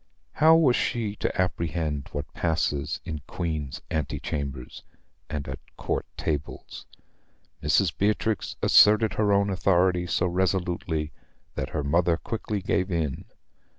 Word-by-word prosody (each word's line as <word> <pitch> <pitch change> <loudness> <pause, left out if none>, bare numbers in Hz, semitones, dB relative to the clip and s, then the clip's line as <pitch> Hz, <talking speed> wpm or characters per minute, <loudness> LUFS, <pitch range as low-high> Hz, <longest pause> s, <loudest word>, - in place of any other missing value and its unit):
How 160 +2 +6
was 145 -7 +5
she 110 -4 -1
to - - -2
apprehend 80 -5 -1
what 75 -1 -5
passes 80 -4 -1
in 75 -2 -5
Queen's 75 -6 -4
ante 80 -3 -2
chambers 70 -4 -5 0.5
and 75 -2 -4
at 65 0 -5 0.2
Court - - -2
tables? 75 -2 -4 0.7
Mrs. 75 +3 +2
Beatrix 105 +1 0
asserted 110 +1 +6
her 105 -1 +1
own 100 0 +3
authority 90 -1 +2
so 85 - +1
resolutely 90 -3 -1 0.4
that - - -3
her 75 - -2
mother 85 +3 +2
quickly 105 -1 -4
gave 95 0 0
in. 80 -6 -2
85 Hz, 125 wpm, -26 LUFS, 75-100 Hz, 0.7 s, How